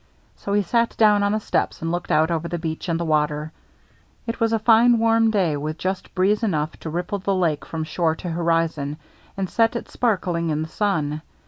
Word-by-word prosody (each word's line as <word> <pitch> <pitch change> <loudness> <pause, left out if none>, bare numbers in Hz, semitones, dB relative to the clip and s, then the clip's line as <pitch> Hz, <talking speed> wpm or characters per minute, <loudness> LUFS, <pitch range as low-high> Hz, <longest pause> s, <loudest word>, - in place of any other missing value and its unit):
So 200 - -4
he 205 0 +3
sat 235 +5 0
down 210 -2 +5
on 205 0 +2
the 215 - +1
steps - - -1
and 165 - -1
looked 175 0 -3
out 160 +2 +3
over 165 0 -1
the 175 - -3
beach 160 +1 -4
and 165 0 0
the 170 - -2
water. 150 0 0 0.7
It 230 - -4
was 225 -1 +2
a 225 - +3
fine 230 +2 +5
warm 225 0 +3
day, 185 -8 +1
with 155 +2 -4
just 185 +2 -4
breeze 195 +4 +2
enough 155 -8 0
to 160 - -6
ripple 175 +5 -3
the 195 +1 0
lake 165 -5 0
from 160 -1 -4
shore 160 0 0
to 175 +1 -6
hori 165 0 +2
zon, 150 -2 -5 0.4
and 195 -1 -1
set 225 +4 +2
it 235 - -5
sparkling 180 -8 0
in 155 0 -1
the 160 - -7
sun. 155 -7 -1
175 Hz, 220 wpm, -22 LUFS, 160-210 Hz, 0.7 s, down